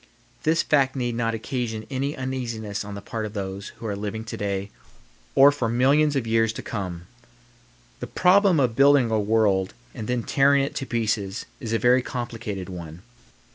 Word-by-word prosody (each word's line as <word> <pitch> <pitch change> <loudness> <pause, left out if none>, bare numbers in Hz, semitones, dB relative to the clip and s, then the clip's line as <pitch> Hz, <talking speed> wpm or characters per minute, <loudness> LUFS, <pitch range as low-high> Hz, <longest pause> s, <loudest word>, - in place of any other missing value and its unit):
This 160 +2 +2
fact 135 -3 +2
need 120 -2 -1
not 115 -1 -1
occasion 115 -2 -3
any 140 +2 -2
uneasiness 120 -6 -4
on 105 0 -7
the 100 - -8
part 110 -1 -4
of 105 -1 -5
those 100 -1 -5
who - - -9
are 105 -2 -2
living 105 +2 -4
to 115 - -6
day 100 0 -3 0.6
or 140 +1 +8
for 130 -6 -2
millions 140 +5 +3
of 135 -4 0
years 115 0 +2
to - - -7
come. 90 -5 -5 0.9
The - - -5
problem 185 -2 +4
of 125 -4 +1
building 140 -3 +5
a 110 - +2
world 100 -3 +1 0.2
and 110 -4 -6
then 125 -1 -1
tearing 140 +1 +3
it 140 - -3
to 135 - -4
pieces 110 -4 -1
is 115 - -5
a 115 - +2
very 125 +2 +4
complicated 115 -6 -5
one. 85 -2 -8
115 Hz, 180 wpm, -24 LUFS, 105-130 Hz, 0.9 s, or